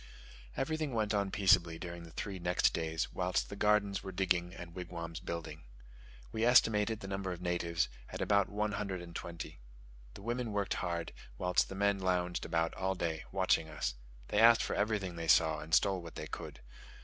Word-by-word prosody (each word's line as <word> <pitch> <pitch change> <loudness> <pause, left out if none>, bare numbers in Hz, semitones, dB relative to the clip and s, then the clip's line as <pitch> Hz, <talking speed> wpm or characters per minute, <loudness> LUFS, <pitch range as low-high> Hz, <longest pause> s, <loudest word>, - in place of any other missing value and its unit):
Everything 155 -2 -1
went 110 -1 +1
on 100 -1 +1
peaceably 90 -4 +4
during 85 0 -7
the 85 - -10
three 95 +3 -5
next 90 +1 +2
days 80 0 -2
whilst 90 0 0
the - - -6
gardens 100 -1 +2
were 95 - -6
digging 90 -2 +1
and 85 -2 -9
wigwams 85 -2 -6
building. 85 -3 -5 0.7
We 110 - -1
estimated 110 -2 +4
the 95 - -6
number 95 -1 -3
of 90 - -5
natives 85 -1 0 0.2
at - - -6
about 100 -1 +3
one 105 +1 -1
hundred 100 -3 -3
and 85 -1 -11
twenty. 85 -7 -6 0.6
The - - -10
women 120 -1 -2
worked 100 -1 0
hard, 85 -2 -2 0.2
whilst 90 +3 +2
the 95 - -6
men 100 0 +2
lounged 90 -1 0
about 80 0 0
all 95 0 -1
day 80 -3 -2
long, - - -20
watching 80 -1 +2
us. 75 -6 -2 0.4
They 105 - +2
asked 115 +1 +7
for - - -2
everything 100 -4 -1
they 85 0 -4
saw, 80 0 +5
and 80 +1 -9
stole 95 +2 +3
what 85 -1 -10
they - - -5
could. 75 -4 -7
90 Hz, 190 wpm, -33 LUFS, 85-100 Hz, 0.7 s, asked